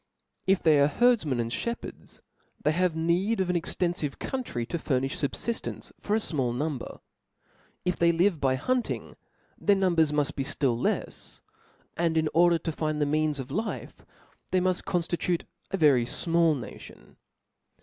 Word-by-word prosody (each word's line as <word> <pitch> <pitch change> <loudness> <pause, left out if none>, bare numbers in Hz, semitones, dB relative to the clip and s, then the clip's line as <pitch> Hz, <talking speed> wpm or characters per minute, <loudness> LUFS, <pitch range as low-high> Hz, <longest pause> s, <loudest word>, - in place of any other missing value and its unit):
If 190 0 +3
they 155 -3 +5
are 140 - +5
herdfmen 200 - +2
and 115 0 -2
(hepherds, 235 - -5 0.4
they 150 - +2
have 175 0 +1
need 175 +7 +1
of 185 -1 +1
an - - -2
exteniive 170 -3 -1
country 245 - -3
to 170 - -3
furnifh 135 -3 0 0.2
fubfjftence 235 -1 -4
for 210 - 0
a - - +3
fmall 130 - -1
number; 145 -1 -4 0.8
if 180 -1 0
they 170 0 +4
live 170 -1 +2
by 130 -1 +3
hunting, 250 - -2 0.4
their 205 - +4
number 185 -4 +2
muft 150 -2 +2
b^ 135 - -2
ftill 135 -5 +2
lefs, - - -3 0.5
and 165 -1 +1
in 160 -1 +2
order 170 0 +5
to 165 - -3
find 155 -1 -2
the 145 - +2
means 155 0 +1
of 135 0 -6
life, 215 +9 -4 0.5
they 185 - +2
muft 185 0 0
conftitute 175 0 -1 0.3
a 195 - -1
very 140 -8 +4
fmall 165 -1 +2
nation. 120 - -11
165 Hz, 160 wpm, -27 LUFS, 145-180 Hz, 0.8 s, they